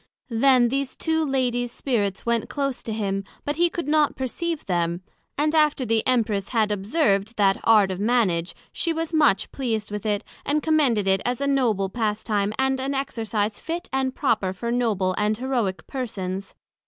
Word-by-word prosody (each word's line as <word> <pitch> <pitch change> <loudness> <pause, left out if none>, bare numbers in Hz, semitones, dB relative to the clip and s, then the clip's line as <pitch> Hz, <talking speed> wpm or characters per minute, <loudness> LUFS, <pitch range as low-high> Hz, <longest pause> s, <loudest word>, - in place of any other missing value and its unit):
Then 245 +1 +4
these 275 +1 -2
two 320 -1 0
Ladies 250 -4 0
Spirits 205 -8 -1
went 235 -1 0
close 275 -3 -2
to 225 - -5
him, 195 -2 -2 0.2
but 290 +1 -2
he 345 0 +4
could 335 -3 -4
not 300 -1 +3
perceive 315 +5 -3
them; 175 -1 -1 0.3
and 300 +2 +1
after 300 -4 +3
the 225 -1 +2
Empress 220 -6 +1
had 220 -3 +1
observed 205 0 0
that 195 -2 +3
Art 210 -4 +5
of 185 - -4
Mannage, 205 -6 +1 0.2
she 335 - 0
was 325 0 -3
much 295 -11 +3
pleased 220 -6 -2
with 210 +1 -4
it, 205 0 0 0.2
and 295 +1 0
commended 275 -11 +2
it 190 0 +3
as 245 0 -1
a 280 - -1
noble 240 -8 +1
pastime, 210 -1 -1
and 265 0 +1
an 275 +1 -2
exercise 225 -6 -2
fit 335 +2 -5
and 265 -1 0
proper 220 -9 +1
for 235 +5 -4
noble 215 -7 +1
and 210 +1 +1
heroick 240 -7 -2
Persons. 195 -7 -5
235 Hz, 175 wpm, -24 LUFS, 205-275 Hz, 0.3 s, Art